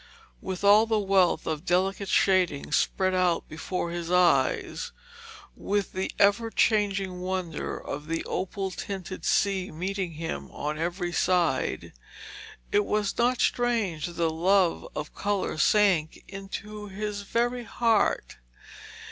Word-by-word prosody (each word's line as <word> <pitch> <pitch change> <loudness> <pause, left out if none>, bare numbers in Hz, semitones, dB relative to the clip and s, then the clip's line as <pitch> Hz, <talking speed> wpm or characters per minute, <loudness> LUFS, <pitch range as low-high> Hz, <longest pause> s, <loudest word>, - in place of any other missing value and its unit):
With 190 0 -5
all 210 +2 +6
the 220 -1 +2
wealth 195 -3 +2
of 155 0 -3
delicate 190 +2 0
shading 185 -7 +2
spread 185 0 +1
out 180 -2 +1
before 170 +2 -4
his 170 -1 -4
eyes, 180 - +2 0.6
with 205 0 -1
the 190 +1 -2
ever 205 +3 +3
changing 200 -5 +1
wonder 185 -2 -3
of 145 +2 -6
the 165 +1 -2
opal 190 +1 -3
tinted 190 0 -6
sea 195 -2 +1
meeting 185 +2 -3
him 165 +1 -5
on 150 +1 -4
every 175 +1 -2
side, 170 -7 0 0.8
it 205 - +3
was 210 0 -1
not 245 +1 +2
strange 225 -11 0
that 175 - -8
the 170 -1 0
love 180 +2 +2
of 150 0 -5
colour 200 -5 -2
sank 190 -5 +3
into 210 +2 -7
his 205 +1 -4
very 240 +4 -1
heart. 230 -3 +1
190 Hz, 130 wpm, -27 LUFS, 175-205 Hz, 0.8 s, all